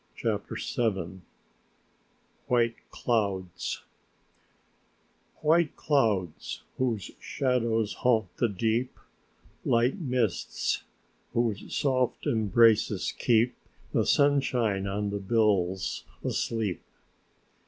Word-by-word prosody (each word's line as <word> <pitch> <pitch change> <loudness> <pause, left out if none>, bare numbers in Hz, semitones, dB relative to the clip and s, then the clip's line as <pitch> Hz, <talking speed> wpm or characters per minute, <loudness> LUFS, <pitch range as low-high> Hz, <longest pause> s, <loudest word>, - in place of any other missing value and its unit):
CHAPTER - - -2 0.2
VII 95 -6 -1 1.3
WHITE 120 -2 +3 0.2
CLOUDS 100 -7 -2 1.6
"White 160 0 +3
clouds, 110 - 0 0.2
whose 115 -7 -1
shadows 115 -5 0
haunt 115 -3 +1
the 120 - +2
deep, 115 +5 -1 0.7
Light 120 +9 +2
mists, 125 - -1 0.5
whose 115 -4 -1
soft 130 -3 +1
embraces 110 -2 +3
keep 120 0 +2 0.4
The - - +2
sunshine 125 -8 +2
on 100 +1 -2
the 100 - -2
bills 95 -3 +1 0.2
asleep." 110 -7 -1
115 Hz, 80 wpm, -28 LUFS, 100-125 Hz, 1.6 s, WHITE